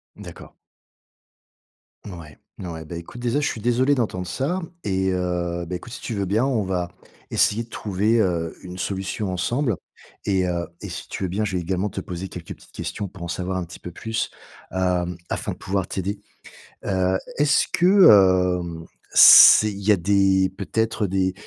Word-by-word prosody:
D'accord. - - -12 1.6
Ouais, 85 -6 -11 0.2
ouais. 85 -3 -6
Bah, 85 +2 -7
écoute, 85 +8 -10
déjà 125 +4 0
je 150 - 0
suis 110 - -4
désolé 125 +5 +2
d'entendre 100 -8 -2
ça 145 - -2 0.2
et, 95 -1 0
heu, 90 -1 -2
bah, 90 +2 -5
écoute 115 +7 -9
si - - -8
tu 120 - -5
veux 100 -2 -2
bien 105 +7 +1
on 125 -6 0
va 90 -2 -2 0.4
essayer 110 +3 +2
de 115 - -17
trouver, 105 +2 0
heu, 85 -5 0
une 90 0 -9
solution 95 +1 -3
ensemble. 120 +6 -1 0.5
Et 95 -2 +1
heu, 85 -1 -2
et 105 - -7
si 85 -1 -7
tu - - -6
veux 95 - -1
bien, 105 +4 -1
je 95 -3 -3
vais 90 - -1
également 95 +4 -2
te - - -5
poser 90 +1 -6
quelques 90 -2 -10
petites - - -21
questions 100 - -5
pour 90 -1 -11
en - - -4
savoir 90 +2 -3
un 90 - -2
petit 85 0 -11
peu - - -8
plus, 110 +6 -3 0.4
hem, 90 -1 -1
afin - - -3
de - - -13
pouvoir 95 -2 -2
t'aider. 100 +2 -4 0.7
Heu, 95 -1 +1 0.2
est-ce 145 +1 +3
que, 175 - +2 0.7
hem, 85 -1 -7 0.3
c'est 110 -1 +9
il 100 - -8
y 105 - +1
a - - +4
des 95 +1 +2
peut-être 110 +1 -1
des, 95 0 0
95 Hz, 185 wpm, -23 LUFS, 90-105 Hz, 1.6 s, c'est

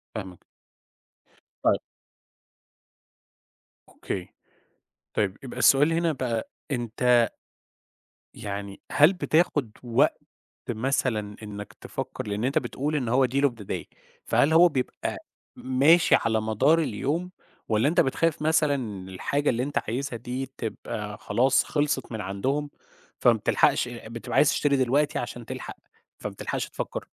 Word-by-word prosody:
فاهمك. 95 -5 -6 1.2
طيب. - - +4 2.1
أوكي، 90 -2 -6 0.8
طيب 100 -2 0
يبقى 125 -1 -7
السؤال 145 +5 +5
هنا 165 -1 +2
بقى، 120 -5 -2 0.2
أنتَ 120 -1 +2 1.0
يعني 100 -1 -6
هل 150 +6 +6
بتاخُد 155 - +1
وقت 120 -1 +2 0.5
مثلًا 110 -3 -1
إنَّك 105 -1 -7
تفكر؟ - - -6
لإن 105 +2 -2
أنتَ 135 +2 +2
بتقول 145 +4 -2
إن 125 -5 -1
هو 130 +2 +4
deal 135 +3 0
of 140 - +5
the - - -10
day، - - -4 0.4
فهل 150 +3 +3
هو 175 +2 +7
بيبقى 130 -5 -3 0.4
ماشي 140 +7 +4
على 110 -1 +2
مدار 110 +9 +3
اليوم، 160 - -1 0.4
والّا 110 +4 +3
أنتَ 175 +4 +3
بتخاف 155 +4 +1
مثلًا 155 -2 +3
إن 105 -8 -5
الحاجة 140 +10 0
اللي 120 0 0
أنتَ 145 +2 -1
عايزها 130 +2 -3
دي 125 +3 -4
تبقى 105 -2 -5
خلاص 125 +6 +2
خلِصِت 145 -5 -1
من 110 - -4
عندهم، 130 +10 -2 0.5
فما - - +6
بتلحَقِش - - +2
بتبقى - - -6
عايِز - - +6
تشتري 145 -1 +2
دلوقتي 135 +3 +2
عشان 120 -1 -6
تلحق، - - -7 0.4
فما - - -5
بتلحقش - - -3
تفكر؟ - - -5
130 Hz, 130 wpm, -26 LUFS, 110-145 Hz, 2.1 s, هو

